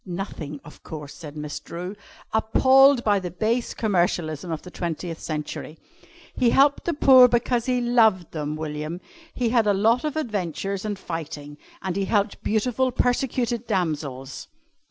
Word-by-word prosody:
"Nothing, 175 -6 -6
of 150 - -14
course," 150 -3 -8
said 150 -2 -10
Miss 150 -1 -5
Drew, 180 +4 -7 0.4
appalled 260 +4 +5
by 205 -2 +3
the 180 -2 -5
base 220 +8 -1
commercialism 175 -5 0
of 160 - -4
the 180 - -10
twentieth 170 -1 -4
century. 155 0 -5 0.6
"He 245 - +2
helped 280 +3 +3
the 340 - 0
poor 260 -3 +8
because 240 0 0
he 250 -1 +2
loved 220 -7 +3
them, 150 -1 -3
William. 155 +2 -5 0.3
He 245 -2 -1
had 230 -2 +2
a 205 - +3
lot 225 +5 +3
of 305 -1 -2
adventures 200 - -3
and 205 -1 -3
fighting 150 -4 -7 0.2
and 190 -2 -2
he 195 0 0
helped 205 -1 0
beautiful, 250 +4 0
persecuted 245 -1 0
damsels." 145 - -3
195 Hz, 155 wpm, -24 LUFS, 160-240 Hz, 0.6 s, poor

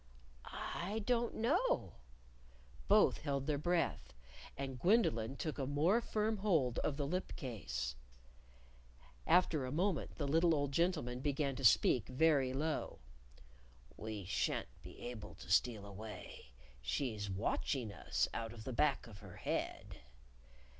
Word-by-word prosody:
"I 205 +5 -4
don't 240 0 +1
know." 365 - +1 0.9
Both - - +5
held 140 -3 -1
their 145 -1 0
breath. 175 - 0 0.4
And 135 -2 -4
Gwendolyn 135 - +3
took 155 +1 -4
a 135 - -1
more 160 - +3
firm 220 -1 0
hold 160 - +2
of 140 - -1
the 145 - -1
lip 180 +6 -2
case. 65 - -4 1.3
After 170 -5 +4
a 130 - -3
moment 175 +1 0
the 145 - -2
little 165 +3 +4
old 145 -1 0
gentleman 150 -6 0
began 140 0 0
to 135 - -6
speak 115 0 +5
very 135 -1 +3
low: 150 +4 -2 1.0
"We 105 -3 -5
shan't - - -1
be - - -11
able 110 -4 -7
to - - -9
steal 110 -5 +3
away. 105 -6 -9 0.3
She's 105 - -2
watching 110 +3 -1
us - - 0
out 115 0 -4
of 110 -2 -9
the 130 - -4
back 140 +3 +2
of 105 -3 -11
her - - -11
head!" - - -3
140 Hz, 135 wpm, -36 LUFS, 115-170 Hz, 1.3 s, Both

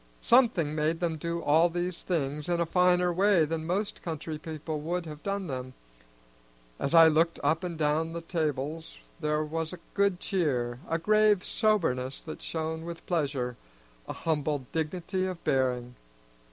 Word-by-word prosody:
Something 220 - +4
made 155 +2 0
them 170 -3 -1
do 170 +2 -3
all 160 +4 +4
these 175 +1 -3
things 150 -3 -2
in 175 -1 +1
a 170 - +2
finer 180 +1 +3
way 190 -2 +4
than 160 +1 -3
most 200 +4 -2
country 160 -2 -5
people 155 -1 -5
would 175 +3 -2
have 150 -1 -8
done 200 -1 -2
them. 130 -4 -5 1.0
As 140 - 0
I 165 -1 +10
looked 165 +2 +2
up 160 +5 +2
and 175 -2 -4
down 155 +1 +1
the 170 - -4
tables 155 -1 -3 0.2
there 150 -1 0
was 160 +2 -3
a 180 - -8
good 200 -3 +2
cheer, 125 -12 -1
a 165 - +1
grave 210 +2 +3
soberness 140 - +1
that 155 - -8
shone 160 0 -3
with 170 0 -8
pleasure, 135 -8 -1 0.5
a - - -4
humble 150 -4 -1
dignity 180 +4 -1
of 185 -2 -6
bearing. 125 -2 0
165 Hz, 160 wpm, -29 LUFS, 150-180 Hz, 1.0 s, I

